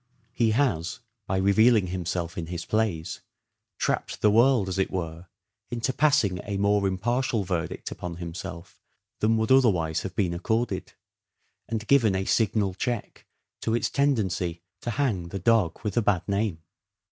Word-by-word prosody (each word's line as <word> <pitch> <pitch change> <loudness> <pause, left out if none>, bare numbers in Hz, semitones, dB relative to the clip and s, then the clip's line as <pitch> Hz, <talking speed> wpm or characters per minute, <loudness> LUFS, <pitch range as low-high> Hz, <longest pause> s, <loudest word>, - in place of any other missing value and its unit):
He 115 -2 +2
has, 110 - 0 0.3
by 95 - 0
revealing 100 +2 +4
himself 90 -1 -3
in 85 -4 -4
his 85 0 -5
plays, 105 -8 -1 0.6
trapped - - -1
the 105 - +5
world, 115 -1 +4
as 95 +1 -2
it 95 - +1
were, 85 -1 -5 0.4
into 120 +2 -1
passing 120 -12 +2
a 100 -2 -3
more 100 0 +2
impartial 115 +4 0
verdict 90 -3 -3
upon 90 -1 -6
himself 85 0 -8 0.4
than 110 +1 +3
would 110 +1 0
otherwise 90 -12 +3
have 95 -1 -6
been 90 -4 +1
accorded, 110 +7 -2 0.8
and 110 0 -2
given 115 -6 +4
a 95 0 -1
signal 105 -3 +1
check 120 +4 -4 0.3
to 115 - 0
its 120 - 0
tendency 95 - 0 0.2
to - - -3
hang 115 -9 0
the 90 - -5
dog 110 -6 +2
with 105 -2 -2
a 120 - +3
bad 95 -4 +1
name. 100 -5 -1
100 Hz, 155 wpm, -26 LUFS, 90-115 Hz, 0.8 s, the